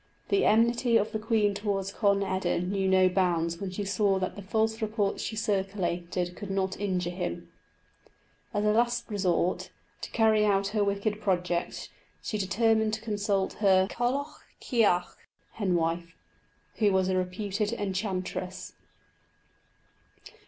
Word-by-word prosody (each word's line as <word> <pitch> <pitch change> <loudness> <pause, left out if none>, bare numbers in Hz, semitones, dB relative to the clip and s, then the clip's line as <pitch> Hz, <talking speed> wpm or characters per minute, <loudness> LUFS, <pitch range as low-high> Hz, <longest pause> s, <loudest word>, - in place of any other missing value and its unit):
The 400 - +3
enmity 235 +2 +4
of 210 0 0
the 220 - -2
queen 215 -2 +2
towards 200 -1 -2
Conn 200 -2 +2
eda 185 -2 0
knew 190 +2 -1
no 185 0 +5
bounds 170 -3 +1
when 195 - -3
she 200 +2 -4
saw 200 0 +2
that 185 -1 -3
the 205 - -7
false 220 +3 0
reports 215 -2 -1
she 220 - -4
circulated 190 -4 -2
could 205 +1 -7
not 190 -1 -1
injure 185 -3 -1
him. 175 -1 -5 1.0
As 210 -1 -1
a 210 - +4
last 235 +2 +1
resource, 185 -3 0 0.3
to - - -5
carry 220 -2 +3
out 200 -1 +2
her 210 0 +1
wicked 200 +1 -1
projects, 180 -3 -1 0.3
she 215 - -4
determined 220 +3 +2
to 220 - -9
consult 205 -3 -1
her 190 -2 +5
Cailleach 265 +5 -2 0.2
chearc 205 -8 +1 0.3
(hen 195 -5 0
wife), 165 0 -1 0.6
who 210 -2 +3
was 190 -1 +2
a 190 - +1
reputed 200 +3 -1
enchantress. 190 -3 -3
200 Hz, 140 wpm, -28 LUFS, 185-215 Hz, 1.0 s, no